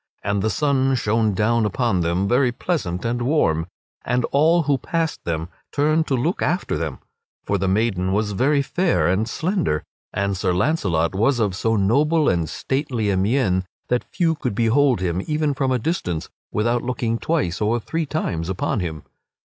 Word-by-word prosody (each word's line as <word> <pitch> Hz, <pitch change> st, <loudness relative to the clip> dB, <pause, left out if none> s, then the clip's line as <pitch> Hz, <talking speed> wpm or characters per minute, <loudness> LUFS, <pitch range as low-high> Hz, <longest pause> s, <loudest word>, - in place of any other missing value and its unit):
And 100 Hz, 0 st, 0 dB
the 110 Hz, -, +1 dB
sun 135 Hz, -1 st, +1 dB
shone 110 Hz, -3 st, +1 dB
down 115 Hz, +3 st, +2 dB
upon 105 Hz, -2 st, +1 dB
them, 85 Hz, +4 st, 0 dB
very 125 Hz, +2 st, +3 dB
pleasant 120 Hz, -, -2 dB
and 120 Hz, +1 st, -1 dB
warm, 105 Hz, -, +1 dB, 0.4 s
and 125 Hz, -1 st, 0 dB
all 165 Hz, +4 st, +4 dB
who 140 Hz, -2 st, +1 dB
passed 165 Hz, +2 st, -2 dB
them 80 Hz, 0 st, -2 dB, 0.2 s
turned 155 Hz, +2 st, +2 dB
to 135 Hz, -, +1 dB
look 155 Hz, +9 st, -1 dB
after 175 Hz, +5 st, 0 dB
them; 75 Hz, -3 st, -3 dB, 0.5 s
for 100 Hz, -, 0 dB
the 95 Hz, -, 0 dB
maiden 95 Hz, -2 st, +1 dB
was 105 Hz, +1 st, 0 dB
very 140 Hz, +8 st, +2 dB
fair 175 Hz, +5 st, +1 dB
and 100 Hz, +6 st, +1 dB
slender, 165 Hz, -, -1 dB, 0.3 s
and 100 Hz, 0 st, -1 dB
Sir 90 Hz, -1 st, 0 dB
Launcelot 90 Hz, -, +1 dB
was 115 Hz, +7 st, +2 dB
of 105 Hz, -4 st, +1 dB
so 115 Hz, +3 st, 0 dB
noble 145 Hz, +10 st, +3 dB
and 85 Hz, -3 st, 0 dB
stately 130 Hz, -6 st, -1 dB
a -, -, +1 dB
mien 95 Hz, -2 st, +1 dB, 0.3 s
that 125 Hz, 0 st, +1 dB
few 170 Hz, -3 st, +1 dB
could 125 Hz, -9 st, -3 dB
behold 120 Hz, 0 st, +3 dB
him 90 Hz, 0 st, -1 dB
even 150 Hz, -1 st, 0 dB
from 135 Hz, -1 st, 0 dB
a 130 Hz, -, +2 dB
distance 110 Hz, -, -2 dB, 0.2 s
without 120 Hz, +3 st, +1 dB
looking 120 Hz, -2 st, -2 dB
twice 130 Hz, -, -1 dB
or 110 Hz, +3 st, +1 dB
three 160 Hz, +7 st, -3 dB
times 85 Hz, -, -2 dB
upon 95 Hz, +3 st, -1 dB
him. 80 Hz, -5 st, -4 dB
115 Hz, 175 wpm, -22 LUFS, 95-145 Hz, 0.5 s, all